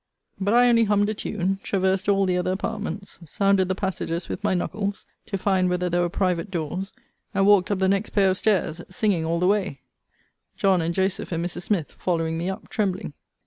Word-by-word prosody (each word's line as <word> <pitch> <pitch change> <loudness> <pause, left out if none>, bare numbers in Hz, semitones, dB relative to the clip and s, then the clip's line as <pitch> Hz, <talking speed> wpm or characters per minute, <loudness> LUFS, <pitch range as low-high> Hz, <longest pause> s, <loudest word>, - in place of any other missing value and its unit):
But 200 +3 +1
I 245 0 +6
only 230 -1 +5
hummed 205 0 +2
a - - 0
tune, 195 -2 -2
traversed 190 0 0
all 195 -1 +3
the 180 -1 +1
other 180 0 0
apartments, 200 -1 -5
sounded 195 +3 +2
the 190 - -1
passages 180 -3 -3
with - - -5
my - - +2
knuckles, 200 +3 -3 0.2
to 200 - -2
find 190 -1 +2
whether 180 0 -1
there 175 +1 +2
were 175 - +1
private 180 0 0
doors, 180 +2 -3 0.4
and 195 0 +3
walked 200 -2 +5
up 205 - +1
the 190 0 +2
next 195 +2 +1
pair 195 -2 +3
of 185 - -1
stairs, 180 -5 +1
singing 185 -3 0
all 165 +1 0
the 180 - +1
way; 190 -8 +1 0.8
John 190 -3 +3
and 165 +1 -1
Joseph, 190 0 -1
and 170 0 -1
Mrs. 175 - -4
Smith, 185 -8 0
following 165 -2 -1
me 170 +3 -2
up, 190 - -6
trembling. 195 -5 -2
190 Hz, 205 wpm, -24 LUFS, 180-200 Hz, 0.8 s, I